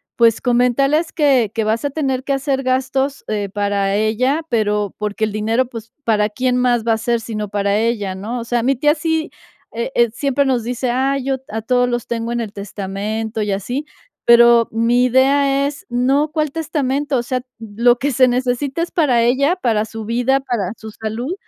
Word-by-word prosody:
pues, 230 -2 +4
comentarles 275 +6 +2
que 265 - +2
que 225 -2 -1
vas 220 +4 0
a 285 - 0
tener 265 -3 -2
que 275 - -3
hacer 270 0 0
gastos, 265 +1 -1
eh, 205 -2 -2
para 200 -1 0
ella, 255 +9 +1
pero, 210 -3 0
porque 210 +1 -2
el 215 - -5
dinero, 225 +4 +1
pues, 230 -2 -10
para 210 -2 +2
quién 250 +3 0
más 245 -2 +1
va 225 - +4
a - - 0
ser, 235 +1 0
sino 215 -2 -5
para 200 0 0
ella, 215 -3 -1
¿no?, 220 +6 -4
o 230 - -6
sea, 235 0 0
mi 265 +1 +1
tía 295 +4 +3
sí, 320 0 -1 0.4
eh, 235 +2 -3
eh, 235 -1 +4
siempre 280 +3 0
nos 255 -4 +1
dice: 245 +1 -2
"Ay, 270 +1 0
yo 270 0 -1
a 220 +1 -4
todos 245 +2 +2
los 240 -1 -2
tengo 235 0 -3
en 240 - -1
el 215 - -5
testamento", 210 +2 -4
y 205 -1 -1
así, 245 +10 -3 0.4
pero, 235 -1 +6
mi 235 +2 +2
idea 275 +2 +3
es 285 0 -5
no 270 +5 +1
cuál 305 -2 0
testamento, 290 -2 -1
o 240 - -1
sea, 255 +1 -2 0.2
lo 230 +2 +2
que 285 +3 -1
se 255 +1 +4
necesita 255 +5 -1
es 340 - -2
para 255 -8 +2
ella, 275 +8 +2
para 225 - 0
su 225 0 -7
vida, 245 +4 +1
para 225 -7 -2
su 220 -1 -9
salud, 225 +9 -4
240 Hz, 200 wpm, -18 LUFS, 220-270 Hz, 0.4 s, pero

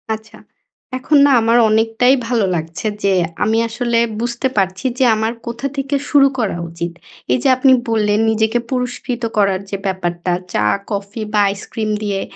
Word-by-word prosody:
আচ্ছা, 220 0 -14 0.6
এখন 290 +4 +2
না 285 - +4
আমার 230 +1 +3
অনেকটাই 225 +3 +3
ভালো 230 -4 +1
লাগছে 165 +5 -4 0.2
যে 200 -1 +3 0.3
আমি 220 +2 +1
আসলে 235 0 -1 0.2
বুঝতে 240 +2 -1
পারছি 190 +2 0
যে - - +4
আমার 220 +1 -1
কোথা 235 +4 -3
থেকে 275 +1 -1
শুরু 280 -2 +6
করা 210 -7 -1
উচিত। 170 +1 -5 0.4
এইযে 130 - +1
আপনি 260 +1 +4 0.2
বললেন 210 -2 +1
নিজেকে 220 +2 +1
পুরস্কৃত 250 -1 -3
করার 195 -2 +2
যে 200 - -3
ব্যাপারটা, 180 -2 -2 0.2
চা, 105 - +1 0.3
কফি 200 +2 -4
বা 210 - +3
আইসক্রিম 215 +2 -4
দিয়ে। 200 -2 -1
220 Hz, 155 wpm, -18 LUFS, 195-240 Hz, 0.6 s, শুরু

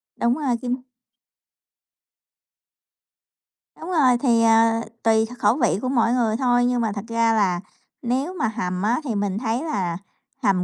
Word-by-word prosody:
Đúng 235 +1 +1
rồi, 270 -5 0
kim 250 0 -3 3.0
Đúng 335 - -8
rồi. 265 -8 +3
Thì, 235 -3 +2
à, 225 0 +4 0.2
tùy 220 -1 +3
kh 245 +2 -11
khẩu 210 +2 +3
vị 200 - +1
của 255 - -2
mỗi 235 -3 +2
người 225 -3 +1
thôi, 245 -2 +2
nhưng 245 -1 +1
mà 220 - 0
thật 200 +1 -6
ra 230 0 +1
là 190 -5 +1 0.4
nếu 260 +8 -2
mà 360 - -1
hầm 185 -5 -3
á 230 +6 +1
thì 235 -7 -3
mình 200 -1 -1
thấy 235 +4 -2
là 185 - -2 0.5
hầm 185 -2 +2
230 Hz, 165 wpm, -22 LUFS, 215-250 Hz, 3.0 s, à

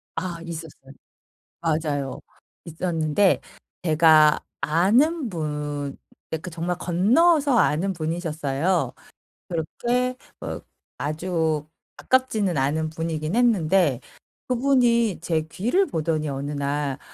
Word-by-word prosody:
아 175 -2 -4
있었어요. 160 -5 -9 0.7
맞아요. 150 -4 -1 0.4
있었는데 165 +2 +1 0.4
제가 155 -2 +5 0.2
아는 230 - +2
분 150 -5 -4 0.4
예 160 - 0
그 170 - -8
정말 175 +1 -3
건너서 255 - +3
아는 190 +2 +2
분이셨어요. 160 0 -1 0.6
그렇게 240 +10 -1 0.3
어 - - -4 0.4
아주 160 0 -1 0.3
가깝지는 220 -8 +1
않은 150 +4 0
분이긴 160 +1 -3
했는데 190 - +3 0.5
그분이 240 -6 +2
제 165 -2 0
귀를 245 - +1
보더니 155 -1 -1
어느 140 +1 -4
날 140 -1 -2
165 Hz, 215 characters per minute, -24 LUFS, 155-200 Hz, 0.7 s, 제가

